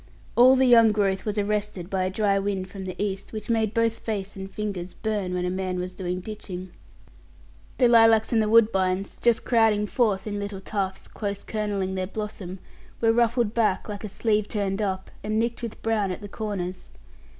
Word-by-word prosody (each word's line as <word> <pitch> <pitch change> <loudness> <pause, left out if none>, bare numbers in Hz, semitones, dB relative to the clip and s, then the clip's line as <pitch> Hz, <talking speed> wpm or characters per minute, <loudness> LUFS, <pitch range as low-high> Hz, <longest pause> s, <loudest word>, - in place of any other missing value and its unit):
All 255 +2 +7
the 265 0 +4
young 230 -3 +7
growth 195 -2 0
was 210 0 -1
arrested 205 -3 -1
by 190 -1 -1
a - - 0
dry 200 0 +1
wind 195 -2 -3
from 195 -2 -7
the 185 -1 -6
east, 200 0 -3
which 215 +1 -4
made 220 -2 +1
both 230 0 +1
face 205 -3 -4
and 190 0 -7
fingers 195 -4 -5
burn 205 -4 -2
when 180 0 -1
a 180 - -1
man 185 -1 -2
was 180 0 -4
doing 180 -1 -3
ditching. 185 -3 -7 1.1
The 250 - +5
lilacs 225 -1 +5
and 225 - +4
the 215 - 0
woodbines, 195 -4 +3
just 235 -1 +2
crowding 220 -3 +3
forth 210 -3 +1
in 205 -1 -3
little 200 -1 -4
tufts, 195 -1 -3
close 200 -2 -4
kernelling 205 -3 -2
their 185 -1 -2
blossom, 200 -3 -6 0.4
were 225 -1 +3
ruffled 235 -1 +2
back, 220 -5 +1
like 205 -1 -6
a 215 - -4
sleeve 210 0 0
turned 200 -1 -1
up, 190 -2 -2
and 215 +1 -1
nicked 235 +2 -1
with 235 -2 -6
brown 220 -3 +1
at 185 - -5
the 205 - -7
corners. 190 -4 -5
205 Hz, 195 wpm, -25 LUFS, 190-220 Hz, 1.1 s, All